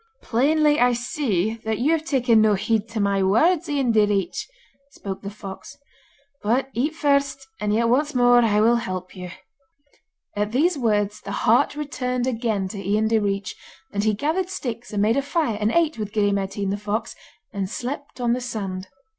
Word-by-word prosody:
'Plainly 295 +5 +3
I 245 0 +4
see 230 - -1
that 220 -1 -1
you 275 +6 +2
have 325 -1 +1
taken 245 -7 +3
no 215 -1 +4
heed 220 +2 -1
to 225 -1 -4
my 200 -1 +1
words, 310 - +3
Ian 275 -5 +1
Direach,' 205 -3 +1 0.4
spoke 195 -7 -7
the 200 - -5
fox. 200 +6 -10 0.6
'But 250 +6 +1
eat 290 +7 -1
first, 280 -2 +1
and 210 0 -1
yet 230 +2 +2
once 285 +4 +1
more 245 0 +5
will 220 +1 +4
I - - -1
help 185 -5 -5
you.' 180 -1 -7 1.1
At 210 +1 -1
these 325 +7 +3
words 210 -5 0
the - - -7
heart - - +4
returned 250 -4 -2
again 225 -6 -1
to 200 0 -6
Ian 210 +3 +1
Direach, 200 -3 0 0.4
and 205 0 0
he 215 -1 +2
gathered 325 - -1
sticks 245 -8 -5
and 205 -1 0
made 225 +4 +2
a - - +3
fire 280 - -1
and 210 +1 +2
ate 320 -5 +1
with 210 -1 -4
Gille 205 -2 +2
Mairtean 195 0 -2
the 200 - -1
fox, 210 +2 -3 0.4
and 195 -2 -3
slept 265 +5 -6
on 240 -1 +1
the 250 - -2
sand. 195 -6 -4
225 Hz, 180 wpm, -23 LUFS, 205-270 Hz, 1.1 s, more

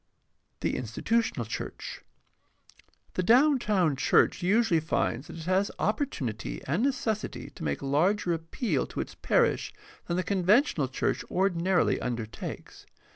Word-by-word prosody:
The - - 0
institutional 130 - -1
church. 110 - -6 0.5
— - - -30
The - - 0
downtown 215 - +4
church 135 - +3
usually 195 -1 +3
finds 150 -4 -1
that - - -9
it 160 - -7
has 190 +3 +2
opportunity 145 - -2
and 155 +10 0
necessity 250 -5 -2
to - - -10
make 70 - -2
larger 175 +7 +2
appeal 165 +8 -2
to - - -7
its - - -4
parish 470 -1 +1 0.4
than 170 - -1
the 185 - +1
conventional 190 - +2
church 130 - -1
ordinarily 185 -1 +1
undertakes. 115 -3 -6
180 Hz, 130 wpm, -28 LUFS, 145-220 Hz, 0.5 s, downtown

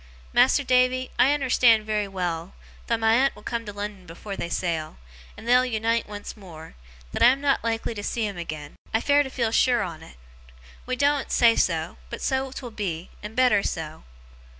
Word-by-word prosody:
Mas'r 260 +3 +4
Davy, 255 0 +2
I - - +6
unnerstan' 255 -6 +4
very 210 -1 -1
well, 175 -2 -4 0.3
though 230 - +1
my 225 0 +3
aunt 265 +4 +3
will - - -14
come 230 -2 -4
to - - -4
Lon'on 205 -3 -7
afore 195 +4 -7
they 170 - -4
sail, 165 - -2 0.4
and 230 - -11
they'll 250 +1 +5
unite 230 -2 -1
once 205 0 -7
more, 165 -6 -12 0.4
that - - -4
I - - +8
am 260 +2 +4
not 280 -1 +1
like 225 -1 -1
to 220 -3 -4
see 225 +2 -2
him 200 -1 -4
agen. 155 -3 -7 0.2
I - - +4
fare 285 +4 +3
to 275 - -3
feel 235 -4 -1
sure 245 +1 +3
on't. 160 - -8 0.7
We 255 - -1
doen't 285 +1 +1
say 230 -1 +5
so, - - 0
but - - -6
so 265 0 0
'twill 255 -2 -7
be, 185 -6 -4
and 210 +2 -8
better 250 -5 +4
so. 160 -4 -5
225 Hz, 195 wpm, -25 LUFS, 190-255 Hz, 0.7 s, I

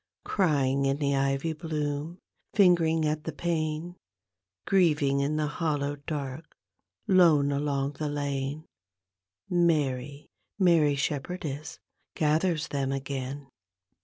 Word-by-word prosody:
Crying 140 -7 +1
in 135 +1 +1
the 140 -1 0
ivy 135 +3 0
bloom, 155 0 -3 0.4
Angering 165 -5 +4
at 150 0 -2
the 160 - -2
pane. 160 +2 -2 0.7
Grieving 150 -7 +3
in 140 +2 0
the 155 0 0
hallow 145 -2 -1
dark, 145 0 -6 0.5
Icmc 160 -7 +5
along 140 -1 -1
the 150 -1 -1
lane, 145 +1 -3 0.8
Mary, 145 -5 0 0.3
Mary 165 -7 +4
Shepherdess 150 +1 -3 0.4
gathers 155 +1 +1
them 135 -2 -1
again. 135 0 -4
150 Hz, 105 wpm, -28 LUFS, 140-160 Hz, 0.8 s, Icmc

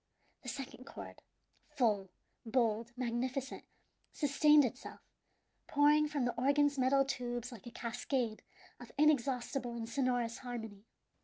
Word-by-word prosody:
The 250 - -6
second 260 -1 -7
chord, - - -10 0.5
full, 220 -10 +1 0.3
bold, 230 -1 0
magnificent, 255 +2 -2 0.5
sustained 295 0 +5
itself, 250 +1 -6 0.7
pouring 295 +1 +4
from 290 -4 -1
the 245 - 0
organ's 285 +1 +3
metal 270 +2 +4
tubes 245 -2 -3
like 230 -2 -11
a - - -7
cascade 235 -1 -2 0.4
of - - -11
inexhaustible 265 -4 +1
and 230 -1 -4
sonorous 245 -2 0
harmony. 225 -4 -7
250 Hz, 115 wpm, -34 LUFS, 235-275 Hz, 0.7 s, sustained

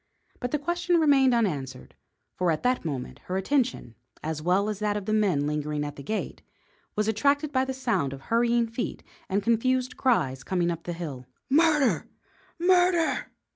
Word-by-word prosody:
But 245 - -3
the 300 - 0
question 345 +3 +1
remained 280 -4 +5
unanswered, 145 - -1 0.4
for 180 -1 0
at 155 -2 0
that 250 0 +1
moment 135 -3 -5
her 185 - -2
attention, 250 - 0 0.3
as 155 0 -3
well 185 +5 +2
as 210 -2 -3
that 210 -1 0
of 205 - -5
the 215 - -1
men 190 -10 +2
lingering 150 0 -2
at 145 0 -6
the - - -9
gate, 215 +10 -4 0.5
was 210 0 0
attracted 280 +7 +1
by 260 -2 +2
the 265 - -3
sound 235 - 0
of 135 0 -8
hurrying 235 +5 +2
feet 230 +2 -5 0.3
and 200 +1 0
confused 255 +3 +1
cries 135 - +1
coming 175 -2 0
up 165 -1 -6
the 175 - -3
hill. 145 -7 -6 0.2
"Murder! 300 -2 +3 0.5
Murder!" 355 -1 +2
215 Hz, 175 wpm, -27 LUFS, 160-265 Hz, 0.5 s, remained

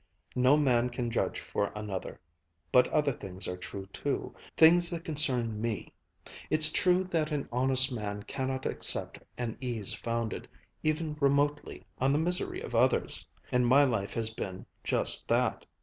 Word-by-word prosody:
No 130 +3 +4
man 125 -4 +2
can 120 -1 -4
judge - - -1
for 100 - -3
another. 105 -3 -6 0.5
But 125 - +5
other 150 -2 +1
things 95 -6 -6
are 90 - -3
true 95 +2 -8
too, - - -3 0.2
things 170 +2 +6
that 170 -2 -5
concern 125 -9 0
me. 115 -2 -4 0.6
It's 155 0 +9
true 180 +2 +2
that 165 -4 -2
an 145 -2 -3
honest 130 +2 +4
man 105 -3 -5
cannot 130 +2 -4
accept - - 0 0.2
an 120 -2 -4
ease 120 -6 -1
founded, 115 -2 -4 0.3
even 155 0 -2
remotely, 145 +1 0
on 135 +2 +2
the - - +2
misery 175 +3 -2
of - - -8
others. 125 +3 +1 0.2
And 125 -1 +2
my 135 +4 +6
life 115 -7 -1
has 110 -1 -1
been 95 -4 -7 0.2
just - - 0
that. - - 0
130 Hz, 155 wpm, -29 LUFS, 115-150 Hz, 0.6 s, It's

